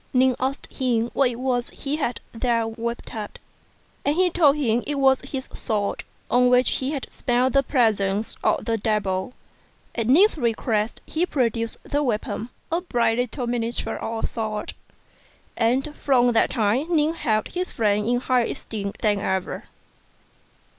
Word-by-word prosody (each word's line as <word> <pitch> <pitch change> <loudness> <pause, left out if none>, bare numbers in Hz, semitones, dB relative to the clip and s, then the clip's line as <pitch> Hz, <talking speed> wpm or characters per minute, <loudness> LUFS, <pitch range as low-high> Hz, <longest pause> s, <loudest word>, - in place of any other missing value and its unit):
Ning 255 0 +4
asked 265 +2 -2
him 240 -3 0
what 275 -2 +3
it 240 - -5
was 245 -1 -1
he 285 +2 -3
had 250 -6 -2
there 230 -1 0
wrapped 235 +1 -5
up, 215 -3 -6 0.7
and 290 - +1
he 365 0 +3
told 305 -5 +5
him 240 -5 +1
it 295 - -1
was 270 -1 +4
his 265 0 -6
sword, 205 -2 -2 0.3
1 250 +1 +4
on - - +5
which 250 0 +4
he 265 - -2
had 285 -3 -3
smelt 250 +1 +1
the 275 - +5
presence 215 -6 +1
of - - +1
the 225 -1 0
devil. 205 +1 -1 0.6
At 230 -2 -2
Ning's 335 - +5
request 225 -2 0
he 340 +3 -1
produced 230 -5 0
the 290 0 -1
weapon, 230 -2 -2 0.2
a 335 +2 +1
bright 235 -8 +1
little 245 +1 -2
miniature 235 0 -1
of 225 0 -4
a - - +2
sword; 215 -2 -4 0.8
and 265 +6 +1
from 245 -3 +3
that 230 - +3
time 255 +9 +1
Ning 310 +1 +3
held 215 -9 0
his 365 +1 -3
friend 210 -2 +1
in 245 0 +1
higher 255 -2 +2
esteem 200 -3 -5
than 205 -2 +3
ever. 190 -2 -2
245 Hz, 165 wpm, -24 LUFS, 225-270 Hz, 0.8 s, told